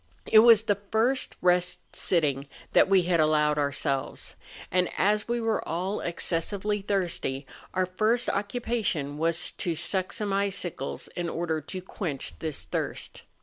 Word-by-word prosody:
It 215 - +7
was 225 -1 +7
the 205 -3 0
first 240 +4 +1
rest 180 0 +1
sitting 145 -6 0 0.3
that - - +5
we 190 -2 +5
had 170 -1 +1
allowed 150 -1 +3
ourselves; 140 -1 -2 0.4
and 180 0 +2
as 210 +1 +2
we 240 0 0
were 225 -1 0
all 185 +5 -1
excessively 195 +5 -1
thirsty 175 -9 -1 0.3
our 185 0 +2
first 215 +7 +1
occupation 200 - -2
was 165 +1 +1
to 170 -2 -2
suck 185 +3 -1
some 205 -2 -2
icicles 195 -7 -2
in 175 -1 -4
order 165 -2 -2
to 185 +5 -7
quench 165 -7 -4
this 155 -3 -3
thirst. - - -4
180 Hz, 145 wpm, -27 LUFS, 160-205 Hz, 0.4 s, It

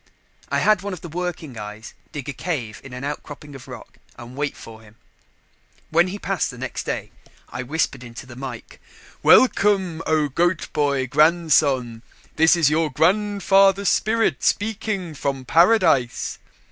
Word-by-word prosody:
I - - 0
had 215 -3 +3
one 200 0 -5
of 175 - -8
the 170 - -8
working 165 -7 -5
eyes 105 +1 -9 0.2
dig 145 -2 -7
a 140 - -4
cave 125 -13 -4
in 135 - -11
an 125 +1 -7
outcropping 145 0 -7
of 135 -2 -11
rock - - -12 0.2
and 120 +1 -11
wait 145 0 -3
for 110 -1 -12
him. 105 -1 -18 1.0
When 170 +3 +4
he 190 +2 -5
passed 195 -6 -2
next 130 +1 -6
day, - - -4 0.4
I 120 - -5
whispered 140 -1 -2
into 120 +1 -10
the 125 -1 -12
mike: 125 -3 -8 0.4
"Welcome, 195 -9 +4
O 155 -2 +2
Goat 175 +6 -1
boy 140 -3 +1
Grandson! 145 -5 +2 0.3
This 160 +2 +5
is 170 -4 +3
your 160 0 +1
grandfather's 195 +4 +3
spirit 225 +1 +1
speaking 205 -5 -1
from 135 -2 -3
paradise." 165 - +3
155 Hz, 150 wpm, -22 LUFS, 130-180 Hz, 1.0 s, This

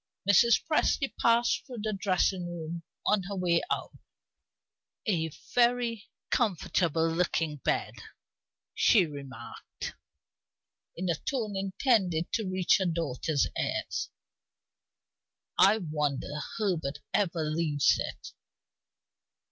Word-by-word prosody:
Mrs. 225 +4 +5
Presty 300 -3 +1
passed 235 +1 +3
through 245 -5 -7
the 215 -1 -1
dressing 185 -2 +1
room 170 -1 -5 0.2
on 210 -1 +3
her 200 - -3
way 175 -2 +2
out. - - -2 1.2
"A 165 -6 +1 0.2
very 240 -3 +2 0.2
comfortable 170 - +1
looking 165 -2 0
bed," - - -1 0.8
she 200 -6 +5
remarked, 135 -6 -8 1.0
in 185 +2 -3
a 170 - +2
tone 215 - -3
intended 190 -3 +1
to 215 -4 0
reach 185 0 +3
her 190 - +1
daughter's 160 -3 0
ears. - - -2 1.5
"I 215 - +7
wonder 150 -7 -2 0.3
Herbert 170 -10 -1 0.2
ever 175 -5 +1
leaves 155 -2 +2
it." - - -6
180 Hz, 100 wpm, -29 LUFS, 160-210 Hz, 1.5 s, I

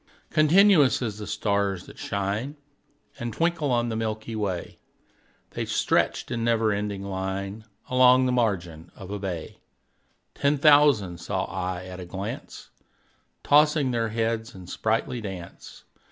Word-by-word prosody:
Continuous 155 -1 +5
as 110 -3 -4
the 105 - -6
stars 100 -3 -1
that - - -14
shine 100 +8 -3 0.6
And 120 0 -3
twinkle 165 +1 0
on 120 -1 +1
the 110 - -3
milky 110 0 -3
way, 95 -5 -3 0.7
The - - -4
stretched - - 0
in 115 -2 -2
never 115 -2 +2
ending 100 -1 -3
line 95 +2 -4 0.2
Along 130 -1 +5
the 125 - +1
margin 90 -9 -1
of 95 0 -10
a 105 - -4
bay: 90 -5 -5 0.7
Ten 145 +1 +1
thousand 140 - +4
saw 95 +2 -2
I 90 -1 -4
at 95 0 -8
a 90 - -7
glance, 95 +3 -7 0.7
Tossing 150 -2 +4
their 115 -2 0
heads 115 0 -2
in 95 -1 -10
sprightly 115 +6 -1
dance. 95 -5 -9
110 Hz, 140 wpm, -25 LUFS, 95-125 Hz, 0.7 s, Continuous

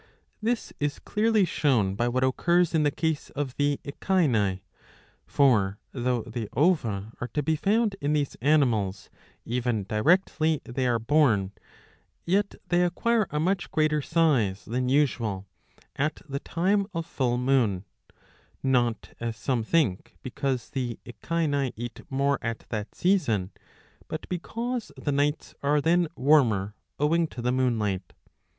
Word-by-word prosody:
This 230 +2 -1
is 145 0 -1
clearly 215 -1 +2
shown 125 - +1
by 120 +5 0
what 130 +2 0
occurs 170 +7 +2
in 160 - +3
the 150 - +3
case 160 +1 -2
of 140 -3 -3
the 145 0 +1
Echini. 130 - +1 0.7
For 105 -8 +3
though 125 -2 -1
the 115 -2 -5
ova 115 - +1
are 120 - -2
to 150 - +1
be 160 +2 +1
found 210 +5 +1
in 145 +1 +1
these 145 -2 0
animals 120 -9 +1 0.3
even 120 -3 -1
directly 155 - +2
they 125 +1 -2
are 120 -1 +2
born, 115 -6 +2 0.7
yet 200 +3 +1
they 175 0 +3
acquire 215 +4 +1
a 150 - -2
much 180 +3 0
greater 155 -1 +1
size 135 - +1
than 125 +2 -1
usual 115 -9 +1 0.5
at 150 +2 -2
the 140 -1 -3
time 195 +6 0
of 165 -1 -2
full 125 -7 -1
moon; 125 -7 +1 0.2
• - - -27 0.5
not, 120 -4 +1
as 115 -1 -3
some 120 +1 -1
think, 115 - 0
because 130 -1 -3
the 125 -3 -3
Echini 145 0 -1
eat 120 +1 -7
more 140 0 +1
at 115 -1 -4
that 105 -2 -4
season, 130 - +1 0.6
but 155 - -6
because 230 +7 -3
the 145 - -2
nights 145 +2 0
are 145 +1 +2
then 170 +3 +3
warmer, 120 -9 +3 0.3
owing 165 +3 +2
to 130 - -10
the 120 +1 0
moonlight. 110 -7 0
140 Hz, 145 wpm, -27 LUFS, 115-160 Hz, 0.7 s, in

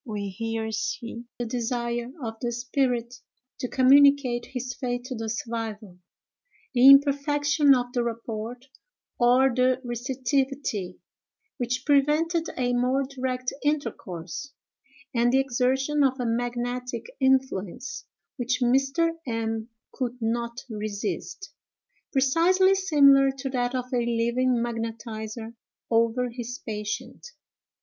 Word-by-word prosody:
We 210 -6 -4
here 225 +2 -3
see 230 +2 -4
the 240 - -3
desire 235 0 -2
of 225 -1 -3
the 240 -2 -1
spirit 240 0 -1 0.5
to 250 - -2
communicate 270 -1 +4
his 250 -1 -5
fate 245 -1 -3
to 255 0 -6
the 225 -1 -4
survivor; 220 -4 -5 0.8
the 250 +1 +6
imperfection 285 +1 +5
of 245 0 -2
the 245 - +1
rapport, 230 0 -4 0.6
or 250 +2 +4
the 255 0 +3
receptivity, 255 -4 -2 0.6
which 250 +1 -2
prevented 310 +4 +2
a 245 -1 0
more 250 +3 +2
direct 255 -2 -3
intercourse; 230 - -3 0.6
and 240 0 +3
the 265 - +4
exertion 270 +3 +1
of 265 -1 +1
a 245 - -1
magnetic 245 +1 -2
influence, 265 - 0 0.3
which 245 0 -1
Mr. 270 +6 +2 0.2
M—— 225 -1 -2 0.2
could 250 -2 -3
not 235 +1 -2
resist, 215 - -5 0.6
precisely 335 +8 +4
similar 280 -8 +5
to 270 0 -4
that 245 -1 -1
of 250 -1 -1
a - - +2
living 235 +2 +1
magnetizer 225 -1 -5 0.4
over 230 +2 +2
his 245 +1 -6
patient. 210 - -5
245 Hz, 115 wpm, -26 LUFS, 230-270 Hz, 0.8 s, the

